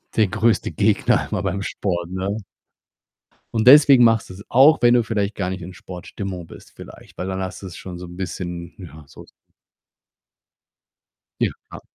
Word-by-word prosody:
der 110 -2 +3
größte 115 +4 0
Gegner - - +1
immer - - -1
beim 100 0 -2
Sport, 85 -4 -3
ne? 95 +3 -3 1.2
Und 110 +1 0
deswegen 140 -2 +8
machst 115 -1 +3
du's 95 +2 -10
auch, 140 +6 +5
wenn 120 0 +5
du 120 - +3
vielleicht 105 -2 -2
gar 90 -2 -2
nicht 95 -1 -5
in 90 +2 -9
Sportstimmung 90 +1 -8
bist - - -15
vielleicht, - - -14
weil 90 - -4
dann 95 0 -3
hast 95 -1 -6
du's 90 -3 -8
schon 90 -2 -8
so 90 - -8
'n 90 0 -12
bisschen 90 -1 -6
ja, 80 -4 -12
so - - -14 2.2
Ja. - - +1 0.2
Klar. - - -10
95 Hz, 165 wpm, -21 LUFS, 90-110 Hz, 2.2 s, deswegen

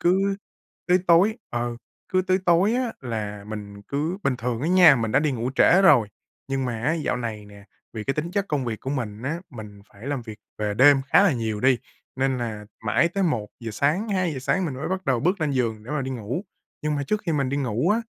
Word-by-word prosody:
cứ 195 +3 +2 0.5
cứ 180 +1 +5
tối 185 +6 +5
ừ, 120 0 -2 0.3
cứ 185 0 +2
tới 185 0 +2
tối 180 +6 +4
á, 250 -2 -1
là 105 -5 -5
mình 100 -1 -8
cứ 150 - -2
bình 135 -3 +1
thường 120 -1 -3
á 160 - 0
nha, 175 -6 +7
mình 110 -3 -2
đã - - +5
đi 150 -2 +1
ngủ 120 0 -2
trễ 190 +6 +5
rồi, 120 - +6 0.4
nhưng 135 -1 -1
mà 115 -3 -3
á, 145 - +2
dạo 155 -6 -1
này 115 -4 -5
nè, 100 0 -14 0.3
vì 110 -2 -5
cái 135 - -1
tính 155 +3 -3
chất 200 +1 -1
công 145 -4 -1
việc 115 -3 -4
của 130 - -4
mình 115 -6 -4
á, 150 +6 -2
mình 105 -5 -10
phải 100 +5 -12
làm 140 -3 -2
việc 110 -2 -9 0.2
về 105 -1 -1
đêm 135 +4 +6
khá 195 - +6
là 200 -5 +4
nhiều 110 -4 -2
đi, 130 0 +4 0.4
nên 135 -1 0
là 110 -3 -4 0.2
mãi 135 +10 +3
tới 195 +3 -2
1:00 115 - -2
sáng, 150 - 0
2:00 185 -8 0
sáng 180 +8 0
mình 150 -6 -3
mới 135 +4 -4
bắt 190 +1 -3
đầu 130 -3 +2
bước 180 - +1
lên 155 -2 +1
giường 115 -5 -1
để 125 - -9
mà 150 -2 -1
đi 130 - -4
ngủ. 125 - -4 0.4
Nhưng 150 0 0
mà 145 - -1
trước 215 0 -1
khi 165 - +1
mình 140 -3 0
đi 140 - -1
ngủ 130 - 0
á, 220 +2 +2
135 Hz, 240 wpm, -24 LUFS, 115-170 Hz, 0.5 s, nha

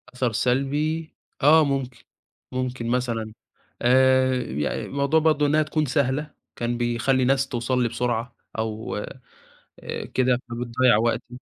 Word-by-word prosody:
أثر 125 -2 0
سلبي، 145 +7 0 0.3
آه 155 +2 +7
ممكن، 130 -4 -3 0.5
ممكن 125 -2 -3
مثلًا 115 -3 -1 0.5
آآ 130 +1 +4
يع 75 - -3
موضوع 140 +3 +1
برضه 155 -2 +2
إنها 155 +1 +3
تكون 155 0 -1
سهلة 140 +2 0 0.2
كان 120 0 -2
بيخلّي 120 +2 +1
الناس 135 +1 +2
توصل 125 0 -1
لي 120 - +1
بسرعة 120 0 -2 0.2
أو 110 0 -3 0.8
آآ - - -5
كده 125 -1 +2
فبتضيّع 120 0 +2
وقتي. 120 +1 -2
130 Hz, 125 wpm, -24 LUFS, 120-140 Hz, 0.8 s, آه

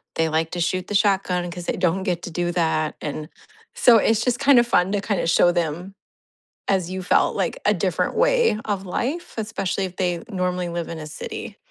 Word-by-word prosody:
they 165 - +1
like 160 +1 0
to 175 - -4
shoot 180 +2 0
the 205 - -3
shotgun 190 -3 +1
'cause 175 0 -7
they - - -2
don't 180 +1 +1
get 180 -3 -1
to 175 - -6
do 175 +1 -1
that, 160 -3 0
and 150 0 -5 0.5
so, 240 -2 +6
it's 220 0 +2
just 245 -1 +1
kind 275 -2 +6
of 240 - +2
fun 180 -3 +2
to 200 - 0
kind 200 -2 -1
of - - -2
show 175 +1 +5
them, 175 +2 -2 0.7
as 185 -3 +1
you 190 0 -4
felt, - - +2
like, - - -2
a - - +4
different - - -1
way - - +3
of 200 -2 -2
life, 280 - -3
especially 210 -3 -2
if 185 -1 -8
they 175 -2 -1
normally 180 -2 -2
live 170 -1 -4
in 165 - -5
a 155 - -7
city. 430 - -7
185 Hz, 215 wpm, -23 LUFS, 175-210 Hz, 0.7 s, so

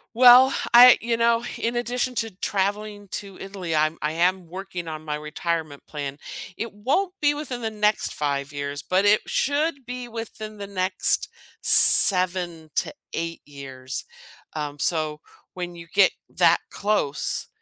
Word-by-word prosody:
Well, 250 +2 +8 0.2
I 245 +1 +9
you 230 0 -1
know, 235 0 +2
in 235 +1 -2
addition 245 +1 -1
to 225 0 -1
traveling 205 +1 -2
to 200 -2 -6
Italy, 190 -4 -5
I'm 155 +1 +1
I 150 +1 -1
am 180 +2 0
working 180 -1 -7
on 155 -1 -6
my 150 -1 -3
retirement 150 0 -4
plan. 145 -1 -6 0.4
It 230 - -5
won't 280 - -1
be 290 -1 +3
within 270 -5 -6
the 220 - -2
next 210 0 0
5 140 -1 -2
years, 145 0 -5
but 190 +2 +2
it 210 +1 +4
should 285 -1 -1
be 250 0 -6
within 220 -2 -8
the 200 - -6
next 185 -1 -1 0.3
7 180 -4 +4
to - - -1 0.2
8 165 0 -4
years. 135 -2 -7 0.5
Um, 145 -1 -4
so 155 0 0 0.4
when 175 -1 -6
you 170 0 -11
get 195 -1 +5 0.2
that - - +4
close, 200 -9 -1
190 Hz, 150 wpm, -24 LUFS, 155-230 Hz, 0.5 s, I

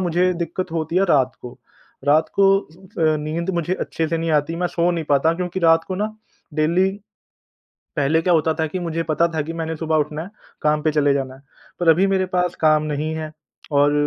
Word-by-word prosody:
मुझे 180 0 +2
दिक़्क़त 175 +1 -4
होती 165 +1 -2
है 195 - +4
रात 130 -5 +3
को। 125 +1 -10 0.5
रात 150 +3 +3
को, 195 0 +5
अ, 165 -3 -2
नींद 160 +4 -3
मुझे 170 +2 -1
अच्छे 165 -3 -3
से 165 0 -1
नहीं 165 0 -1
आती 150 +2 +1
मैं 180 - 0
सो 170 +1 +1
नहीं 165 -2 -2
पाता 145 +3 +4
क्योंकि 180 +1 -3
रात 165 -1 +4
को 190 - -2
ना 215 +2 -2 0.4
डेली 170 +5 +2 1.1
पहले 150 +3 +2
क्या 180 - +2
होता 160 0 +2
था 160 - +1
कि 170 +4 -4
मुझे 165 -1 -2
पता 160 +2 +3
था 155 - 0
कि 160 +3 -6
मैंने 165 -1 -3
सुबह 160 0 0
उठना 150 +1 -1
है 185 - -10 0.3
काम 150 0 +2
पे 155 - +2
चले 145 -2 +3
जाना 130 -2 -3
है। 135 - -16 0.4
पर 175 - +1
अभी 175 +5 +5
मेरे 190 -1 +1
पास 180 -1 +1
काम 155 -1 +4
नहीं 155 +1 -2
है 155 -1 -5 0.4
और 145 0 +4
160 Hz, 215 wpm, -21 LUFS, 155-175 Hz, 1.1 s, को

